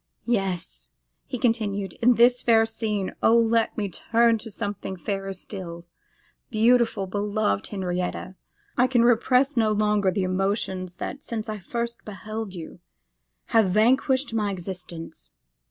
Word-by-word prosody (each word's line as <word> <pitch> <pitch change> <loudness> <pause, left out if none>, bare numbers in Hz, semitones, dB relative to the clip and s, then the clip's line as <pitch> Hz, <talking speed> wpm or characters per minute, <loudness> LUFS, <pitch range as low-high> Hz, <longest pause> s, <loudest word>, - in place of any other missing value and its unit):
'Yes!' 180 - -2 0.4
he 255 - -4
continued, 205 -6 0
'in 245 +1 +5
this 245 +2 +5
fair 225 -1 +4
scene, 215 -3 -3
oh! 230 - +5
let 230 -1 +2
me 210 -2 -1
turn 230 +5 +2
to 225 - -8
something 205 -2 -4
fairer 195 +2 -4
still. 180 -3 -8 0.6
Beautiful, 225 -2 +3
beloved 200 - -1
Henrietta, 180 -1 -3 0.4
I 250 +1 +4
can 245 -2 +3
repress 250 +4 +3
no 220 -2 +3
longer 210 -2 +2
the 190 +1 -1
emotions 185 -1 -1
that, 280 - -5
since 225 -4 -5
I 215 -1 -4
first 235 +5 -4
beheld 215 0 -6
you, 170 +1 -9 0.7
have 220 -4 +5
vanquished 260 +6 +2
my 210 -2 0
existence. 175 - -7
210 Hz, 135 wpm, -25 LUFS, 190-230 Hz, 0.7 s, in